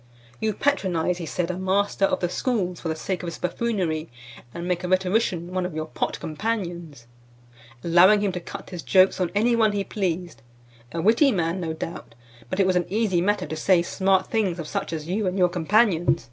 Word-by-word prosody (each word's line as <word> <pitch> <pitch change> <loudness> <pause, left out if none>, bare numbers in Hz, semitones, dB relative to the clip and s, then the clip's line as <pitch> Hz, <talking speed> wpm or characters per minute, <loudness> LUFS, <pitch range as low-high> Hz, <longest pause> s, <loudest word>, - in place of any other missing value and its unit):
"You 215 -2 -1
patronize," 180 - 0
he 165 - -5
said, 175 +2 -2
"a 180 - -5
master 195 +1 +1
of - - -1
the 175 - +1
schools 185 -2 -2
for 165 - -3
the 160 - -1
sake 185 +3 -3
of 180 - -6
his 170 - -5
buffoonery, 180 -5 -2 0.4
and 170 +4 -6
make 180 0 -1
a - - -2
rhetorician 185 -1 0
one 185 0 0
of 180 -3 -4
your 155 0 -2
pot - - -3
companions; 170 - -4 0.8
allowing 180 +5 +6
him 205 -2 +1
to 180 - -4
cut 170 - -9
his 175 -2 -5
jokes 190 +2 +4
on 180 - +1
any 235 +3 +3
one 220 -2 +3
he 200 -1 -1
pleased; 175 - -3 0.5
a 165 -1 -3
witty 230 - +5
man, 175 -2 -1
no 160 -2 -2
doubt, 160 -7 -7 0.3
but 185 - -3
it 195 - +4
was 185 -1 +2
an 175 -1 0
easy 205 -4 +1
matter 205 +3 +1
to 155 +2 -5
say 170 +2 +3
smart 190 +1 +1
things 200 -6 0
of 165 -3 -6
such - - -3
as 155 -1 -5
you 195 +3 -1
and 185 +1 -1
your 180 -1 +4
companions. 175 +1 +2
180 Hz, 210 wpm, -24 LUFS, 170-200 Hz, 0.8 s, allowing